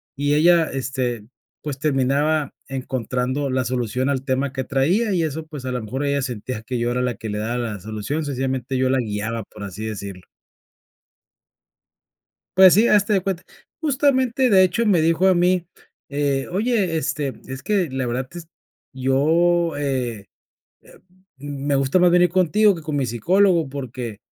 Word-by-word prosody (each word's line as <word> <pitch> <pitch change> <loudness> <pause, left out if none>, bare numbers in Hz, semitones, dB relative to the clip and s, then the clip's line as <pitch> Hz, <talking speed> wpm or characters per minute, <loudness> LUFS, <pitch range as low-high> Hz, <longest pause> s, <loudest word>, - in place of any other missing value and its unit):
Y 145 +1 0
ella, 165 +2 +5
este, 125 -4 -3 0.3
pues, 145 -3 -5
terminaba 145 +1 +1
encontrando 130 +1 -2
la 130 0 +1
solución 125 +1 -1
al 135 -2 -1
tema 135 0 -1
que 130 - -2
traía, 175 - +1
y 175 - +1
eso 160 0 -3
pues, 150 -4 -9
a 130 - -2
lo 125 -2 -2
mejor, 130 +7 -4
ella 140 0 0
sentía 120 -2 -5
que 125 +1 -3
yo 120 +1 0
era 125 +1 -1
la 125 -2 -1
que 110 - -7
le 105 - -3
daba 115 +3 -2
la 110 -4 -4
solución. 110 - -4
Sencillamente 130 -1 -2
yo 130 0 +1
la 135 - +2
guiaba 110 0 -3
por 105 - -12
así 100 +2 -6
decirlo. 100 -4 -6 2.3
Pues, 190 -1 +8
sí 220 +5 +5
hazte 210 0 +3
de 195 - +3
cuenta 185 -1 -3 0.4
justamente 260 -3 +2
de 190 -4 +6
hecho 225 +5 0
me 180 -6 +3
dijo 165 +3 +3
a 185 - +5
mí, 180 0 +2 0.4
eh: 140 -1 -1
"Oye, 200 -3 0
este, 145 -3 -2
es 130 +1 -7
que 190 -8 0
la 130 -1 -2
verdad 125 +2 -2
es, 170 -2 -9 0.5
yo, 160 +5 +2
eh, 125 -7 -2 0.6
eh, - - -19 0.4
m 140 0 -6
me 145 - +2
gusta 135 +5 +2
más 180 -1 +4
venir 180 0 +5
contigo 185 +3 +3
que 165 - -9
con 155 -1 -4
mi 140 -3 0
psicólogo 170 - +2
porque 125 -5 -6
140 Hz, 175 wpm, -22 LUFS, 125-175 Hz, 2.3 s, Pues